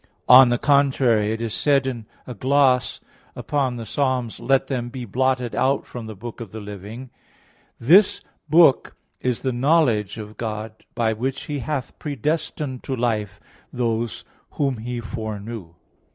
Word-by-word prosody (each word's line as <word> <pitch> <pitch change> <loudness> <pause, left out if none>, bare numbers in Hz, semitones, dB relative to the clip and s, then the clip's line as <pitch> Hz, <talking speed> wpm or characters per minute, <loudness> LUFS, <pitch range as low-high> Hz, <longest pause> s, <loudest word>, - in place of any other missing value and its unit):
On 125 0 +9
the 120 - +2
contrary, 130 -6 +3
It 110 +1 -3
is 115 -2 -3
said 140 -2 +2
in 120 -5 -4 0.2
a 125 - -7
gloss 130 +2 +2 0.3
upon 135 -4 -1
Ps. 115 -3 -7
68:29, 125 -3 -1
"Let 135 -1 +4
them 120 -3 -3
be 125 0 -6
blotted 125 +2 0
out 135 +1 +1
of 115 -2 -5
the 110 - -8
book 120 +4 -8
of 110 -5 -8
the 110 - -7
living," 105 +5 -9 0.7
"This 185 - +5 0.3
book 160 -3 +5 0.2
is 125 -2 -2
the 130 -2 0
knowledge 120 - +2
of 105 0 -9
God, 110 -1 -4 0.2
by 115 -2 +1
which 130 +5 -3
He 145 -1 -4
hath 140 -1 -4
predestined 145 -1 -3
to 135 - -3
life 110 -5 -2 0.3
those 115 -2 -2 0.3
whom 135 -4 0
He 120 +2 -5
foreknew." 110 -5 -6
120 Hz, 150 wpm, -22 LUFS, 110-135 Hz, 0.7 s, On